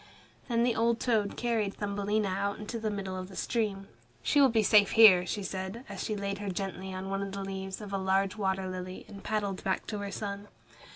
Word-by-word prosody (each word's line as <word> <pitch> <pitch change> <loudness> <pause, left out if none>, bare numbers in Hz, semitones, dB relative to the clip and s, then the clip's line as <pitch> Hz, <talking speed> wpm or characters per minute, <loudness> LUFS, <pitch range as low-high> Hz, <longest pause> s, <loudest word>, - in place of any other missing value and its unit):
Then 235 -1 +2
the 240 -1 +2
old 230 0 +2
toad 215 -5 +1
carried 225 -4 0
Thumbelina 205 +1 -1
out 200 +2 -1
into 215 +2 -5
the 220 -1 -1
middle 195 -2 -4
of 185 0 -5
the 190 - -11
stream. 205 -4 -1 0.4
"She 290 - +4
will 270 - +7
be 225 -2 +3
safe 205 -1 +5
here," 190 -6 +8
she 205 - -2
said, 190 +6 -5
as - - -5
she 215 - -2
laid 200 0 -3
her 205 -1 -3
gently 190 0 -4
on 190 +1 -5
one 195 0 -1
of 195 -1 -4
the 200 0 -4
leaves 190 +1 -5
of 205 -1 -7
a 195 - 0
large 190 +1 +1
water 190 -2 -1
lily, 185 0 -6
and 200 -2 -11
paddled 205 -3 -2
back 190 - -1
to 210 - -4
her 200 0 -4
son. 200 0 -5
200 Hz, 225 wpm, -30 LUFS, 190-215 Hz, 0.4 s, here